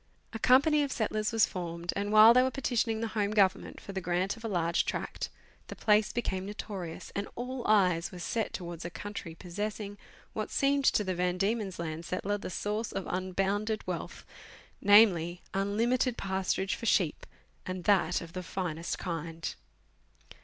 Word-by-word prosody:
A 225 - -4
company 285 +6 +5
of 285 -2 -1
settlers 215 -1 -1
was 225 -2 +4
formed, 170 -1 -4
and, 205 +1 -2
while 215 +2 +9
they 250 - +6
were 260 - +2
petitioning 235 -4 0
the 230 - -1
Home 210 -2 0
Government 200 -3 +2
for - - -9
the 190 - -3
grant 180 +2 0
of 225 - -14
a - - -2
large 170 -4 +1
tract, - - -3 0.4
the - - -7
place 210 -1 +3
became 190 -5 -2
notorious, 195 -5 -6
and 200 0 -2
all 250 +1 -4
eyes 180 -5 +3
were 185 - -9
set 220 +6 -2
towards 175 -2 -6
a 170 - -4
country 175 -3 -7
possess 205 +5 -4
ing 205 -1 -7 0.3
what 215 -1 -3
seemed 280 0 +2
to 210 - +4
the 190 -2 -1
Van 180 0 0
Diemen's 200 0 -1
Land 165 -1 -4
settler 200 +3 -2
the - - -6
source 210 +4 -2
of 195 - -4
unbounded 195 +4 -1
wealth, - - -5 0.6
namely, 185 -5 +5
unlimited 230 +6 +1
pasturage 190 0 -1
for 230 - -4
sheep, 175 -7 +1 0.4
and 185 -1 -4
that 180 -3 +3
of 165 -1 -10
the 185 - -4
finest 170 -2 -3
kind. 165 -2 -4
200 Hz, 175 wpm, -30 LUFS, 180-220 Hz, 0.6 s, while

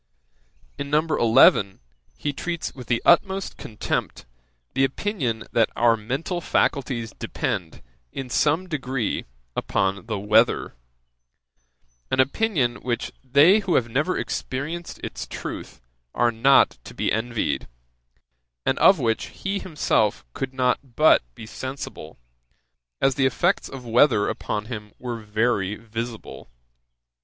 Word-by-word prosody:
In 140 - -4
No. 150 +1 +4
11, 115 -7 +5 0.4
he 145 - -2
treats 170 +3 -4
with 125 -4 -10
the 115 0 0
utmost 190 +3 +3
contempt 110 -2 -4 0.5
the 135 - +2
opinion 135 - -1
that 115 -1 +3
our 115 -1 +4
mental 135 - -3
faculties 125 -9 0
depend, 85 -4 -3 0.3
in 135 - -5
some 155 +8 +1
degree, 135 - -2 0.3
upon 100 +3 -1
the 110 -3 -2
weather; 105 +4 +2 1.4
an - - 0
opinion, 135 - +1
which 120 -2 -3
they 145 - +6
who 195 -4 0
have 120 -2 +2
never 145 +10 0
experienced 155 +6 -4
its - - -5
truth - - -7 0.4
are 120 0 +3
not 120 - +4
to - - -11
be - - 0
envied; 115 +1 -1 1.0
and - - +1
of - - +7
which 115 -1 0
he 195 +1 -4
himself 150 - 0
could 135 - -4
not 130 -1 +1 0.2
but 155 +1 +6
be 110 - -9
sensible, 130 - -7 0.8
as 135 - +3
the 135 0 +2
effects 120 -4 0
of 130 -2 -9
weather 120 -2 +4
upon 105 0 -3
him 105 -3 -7
were 120 -2 -5
very 105 -2 0
visible. 115 - -7
125 Hz, 125 wpm, -24 LUFS, 110-145 Hz, 1.4 s, of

